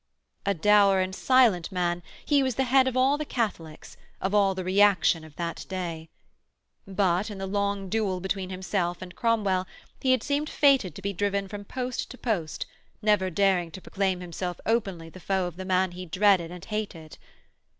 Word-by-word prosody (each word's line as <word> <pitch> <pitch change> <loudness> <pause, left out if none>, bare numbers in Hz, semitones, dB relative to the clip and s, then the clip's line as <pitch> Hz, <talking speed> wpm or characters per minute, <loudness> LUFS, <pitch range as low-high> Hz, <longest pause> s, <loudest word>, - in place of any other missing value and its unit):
A 200 - +2
dour 200 +2 +5
and 185 0 -1
silent 230 -7 +3
man, 175 -1 -1 0.2
he 290 -2 +3
was 260 -3 0
the 265 - +1
head 260 +1 +4
of 255 -1 -1
all 270 +3 +3
the - - -1
Catholics, 200 - -4 0.2
of 190 +1 -2
all 200 -2 +3
the 185 - -3
reaction 185 -3 +3
of 155 -2 -14
that 170 -1 -4
day. 170 -4 -5 0.8
But, 190 0 +1
in 205 - -7
the 195 - -4
long 200 0 -1
duel 195 -2 -1
between 190 0 -3
himself 185 -1 -2
and 180 -1 -11
Cromwell 205 -5 +1 0.3
he 260 - 0
had 255 -3 +3
seemed 290 +1 -1
fated 270 - +3
to 195 - -10
be 200 0 -2
driven 200 +1 -1
from 205 +1 -8
post 250 +2 -4
to 255 - -10
post, 175 -12 -2 0.4
never 210 -3 +3
daring 185 -1 +2
to 190 - -9
proclaim 190 -2 -1
himself 180 0 -5
openly 195 -8 -1
the 185 - -12
foe 190 0 0
of 175 -2 -6
the 185 +1 -7
man 185 0 +1
he 180 +1 -8
dreaded 185 -1 +3
and 180 0 -9
hated. 200 -8 -5
195 Hz, 185 wpm, -27 LUFS, 180-210 Hz, 0.8 s, dour